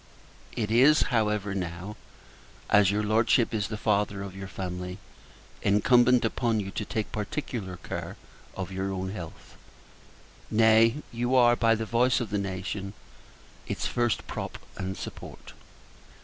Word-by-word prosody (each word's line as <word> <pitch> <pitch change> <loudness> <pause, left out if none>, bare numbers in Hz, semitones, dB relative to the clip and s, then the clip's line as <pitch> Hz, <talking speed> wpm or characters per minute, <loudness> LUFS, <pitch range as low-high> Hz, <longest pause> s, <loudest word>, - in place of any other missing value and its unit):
It 110 -2 -2
is, 135 +7 +6
however, 105 -3 +1
now 90 +2 -5 0.8
as 105 -2 +6
your 105 +1 0
Lordship 115 +3 +2
is 105 -2 0
the 105 - -5
Father 100 -2 0
of 95 -1 -8
your 95 0 -7
Family 90 -1 -5 0.6
incumbent 120 +4 +4
upon 115 0 0
you 95 -1 -4
to 105 - -3
take 110 +1 -3
particular 105 -3 -4
care - - -6 0.4
of 95 0 -4
your 95 +1 -2
own 95 0 -3
health. 85 -6 -9 0.9
Nay, 115 +4 +4
you 120 +2 0
are, 120 -1 +6
by 115 -1 +3
the 110 0 -3
voice 125 +3 +2
of 115 -5 -4
the 105 - 0
nation, 95 +1 -4 0.7
its - - -3
first 120 -2 0
prop - - -5 0.2
and 95 0 -4
support. - - -9
105 Hz, 140 wpm, -27 LUFS, 95-115 Hz, 0.9 s, is